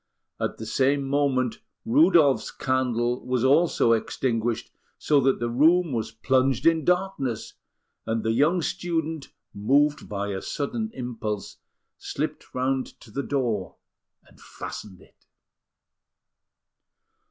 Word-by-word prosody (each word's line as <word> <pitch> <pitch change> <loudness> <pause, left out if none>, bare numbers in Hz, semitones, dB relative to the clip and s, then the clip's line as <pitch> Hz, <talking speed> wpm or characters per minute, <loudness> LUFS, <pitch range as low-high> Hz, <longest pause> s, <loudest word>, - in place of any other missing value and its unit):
At - - -2
the 110 - -7
same 135 +4 +1
moment, 135 -3 +1 0.3
Rudolf's 200 - +4
candle 125 -3 -1
was 125 -2 -1
also 145 -2 +4
extinguished, 115 0 -1 0.3
so 150 -2 +3
that 135 0 +2
the 120 - -1
room 160 +7 +3
was 110 -2 -2
plunged 130 +3 +1
in 165 -1 +4
darkness; 180 - -1 0.5
and 110 0 -1
the 110 - +1
young 155 +9 +2
student, 160 -4 -2 0.3
moved 140 +8 +2
by 100 0 -3
a 95 -1 -3
sudden 220 +10 -3
impulse, 110 -5 -5 0.4
slipped - - -5
round 130 +1 -1
to 110 - -15
the 140 - -2
door 120 -9 -2 0.5
and - - -21
fastened 95 -4 -9
it. - - -24
130 Hz, 120 wpm, -25 LUFS, 115-150 Hz, 0.5 s, Rudolf's